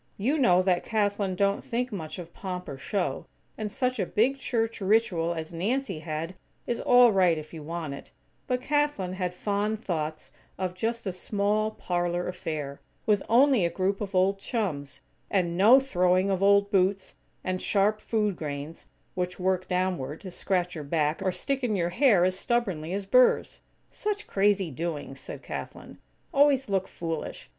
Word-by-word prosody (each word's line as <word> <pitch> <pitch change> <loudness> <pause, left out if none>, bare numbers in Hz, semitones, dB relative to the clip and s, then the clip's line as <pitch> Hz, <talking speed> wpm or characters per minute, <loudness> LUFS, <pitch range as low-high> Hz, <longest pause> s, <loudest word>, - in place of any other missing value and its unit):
You 270 +10 +1
know 185 -8 +5
that 180 -2 +2
Kathlyn 205 -3 0
don't 200 +1 +1
think 245 +2 -2
much 160 -6 -6
of 170 -2 -9
pomp 180 -2 -5
or 140 - -5
show, 160 0 -2 0.3
and 215 -1 -4
such 255 +2 -1
a - - +1
big 260 +6 +1
church 225 -3 -1
ritual 190 -5 +2
as 160 +1 -6
Nancy 200 +1 -1
had 160 +2 -4 0.3
is 240 - -2
all 245 -1 +6
right 180 -4 +3
if 155 +1 -8
you 160 - -7
want 160 -1 -4
it, 140 - -10 0.4
but 250 0 0
Kathlyn 290 -11 0
had 185 -1 -2
fond 205 +3 -2
thoughts 155 -3 -3 0.3
of 185 -1 -2
just 225 +5 -2
a 190 - -2
small, 205 +3 0
parlor 175 -3 -2
affair, 150 -5 -5 0.2
with 205 -2 +3
only 255 -2 +5
a 170 - +2
group 190 +4 -1
of 200 -2 -4
old 195 +2 +3
chums; 185 - -3 0.3
and 175 -3 +1
no 220 +9 +7
throwing 185 -6 +2
of 190 -1 0
old 200 0 +4
boots, 190 0 +1 0.3
and 185 0 -2
"sharp 210 +1 +2
food 210 -4 0
grains," 145 0 -6 0.3
which 180 0 -3
work 185 0 0
downward, 180 -6 -1
to 185 - -8
scratch 180 -1 -1
your 155 -4 -5
back, 150 +2 0
or 190 -1 +1
stick 270 +9 -2
in 225 -4 +1
your 175 -2 0
hair 195 -3 +4
as 185 0 +1
stubbornly 190 -8 -1
as 195 +1 -2
burrs. 250 +5 +3 0.3
"Such 420 0 -3
crazy 195 -3 +2
doings," 145 -2 -4
said - - -7
Kathlyn, - - -7 0.4
"always 275 -3 +4
look 190 -1 0
foolish. 165 -2 -5
190 Hz, 170 wpm, -27 LUFS, 175-215 Hz, 0.4 s, no